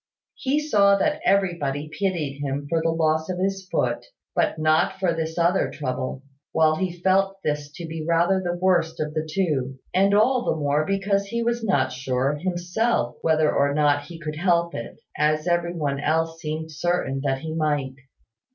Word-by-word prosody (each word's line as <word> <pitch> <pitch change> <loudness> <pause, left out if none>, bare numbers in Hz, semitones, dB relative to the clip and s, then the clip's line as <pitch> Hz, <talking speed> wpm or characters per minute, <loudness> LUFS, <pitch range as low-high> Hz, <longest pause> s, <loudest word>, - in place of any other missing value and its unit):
He 280 +2 0
saw 205 -10 +4
that 300 +9 0
everybody 170 -7 +1
pitied 155 -4 -2
him 140 0 -2
for 165 +2 +1
the 165 - +1
loss 160 0 +1
of 185 - -2
his 190 0 -2
foot, - - 0 0.3
but - - +1
not 155 +5 +2
for 185 -3 +1
this 160 0 -3
other 175 +2 +2
trouble, 130 -1 -4 0.3
while 155 -1 +3
he 180 -1 -3
felt 195 +1 +2
this 150 -1 -2
to 170 - -7
be 160 -1 -5
rather 170 +4 +2
the 175 0 -2
worst 175 -3 +1
of 150 0 -2
the 155 0 -3
two; 140 -8 -1 0.2
and 195 +2 +4
all 245 +4 +3
the - - 0
more 150 0 0
because 195 0 +1
he 235 +3 -2
was 235 0 -1
not 135 -11 +1
sure 130 +1 -1
himself 175 - -1
whether 155 -1 +2
or 140 0 +2
not 145 -1 +2
he 165 +2 -9
could 155 -1 -5
help 170 0 +2
it, 115 - -7 0.2
as 155 +1 +1
every 175 0 +1
one 145 -4 -1
else 165 +2 0
seemed 160 +1 -4
certain 155 -4 -1
that 135 -1 0
he 160 -1 -5
might. 145 -4 0
160 Hz, 180 wpm, -24 LUFS, 150-185 Hz, 0.3 s, saw